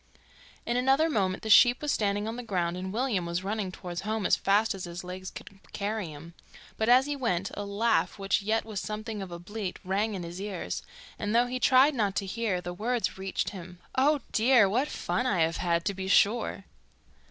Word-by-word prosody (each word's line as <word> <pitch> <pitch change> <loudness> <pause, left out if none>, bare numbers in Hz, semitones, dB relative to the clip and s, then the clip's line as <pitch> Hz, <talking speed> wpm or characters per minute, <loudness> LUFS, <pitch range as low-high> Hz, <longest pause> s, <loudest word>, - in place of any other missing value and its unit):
In 240 - 0
another 270 +6 +3
moment 190 -6 0
the 220 - -4
sheep 245 +3 +7
was 295 -1 -1
standing 205 0 0
on 225 - -3
the 245 - -5
ground 180 -7 -1
and 185 +1 -5
William 225 -4 0
was 170 +2 -2
running 200 -1 -2
towards 180 -1 -6
home 215 -1 -2
as - - +4
fast 210 +3 +2
as 190 -2 -6
his 175 +1 -7
legs 185 +1 -7
would 195 - -13
carry 210 -1 -2
him. 155 +2 -10 0.4
But 220 +1 0
as 255 +2 +6
he 290 0 -2
went, 195 -9 -1
a 205 - -4
laugh, 215 +4 +1
which 195 +1 0
yet 220 +2 0
was 215 -3 -4
something 215 0 -5
of 190 - -6
a 170 - -5
bleat, 195 +2 -5
rang 200 +3 0
in 180 - -5
his 170 +2 -7
ears, 200 -3 -4 0.4
and 210 +1 -1
though 240 +1 +5
he 250 +1 -3
tried 265 +3 +5
not 205 -6 0
to 200 - -1
hear, 195 -2 -2
the 175 0 -5
words 225 +2 -1
reached 190 0 -2
him, 180 -2 -9 0.2
'Oh, 285 +2 +3
dear! 235 -2 +5
What 245 +9 +1
fun 255 - -2
I 185 -8 +1
have 165 +1 +1
had, 170 -1 0
to 200 - 0
be 190 0 -5
sure! 205 +1 +2
205 Hz, 215 wpm, -28 LUFS, 185-230 Hz, 0.4 s, sheep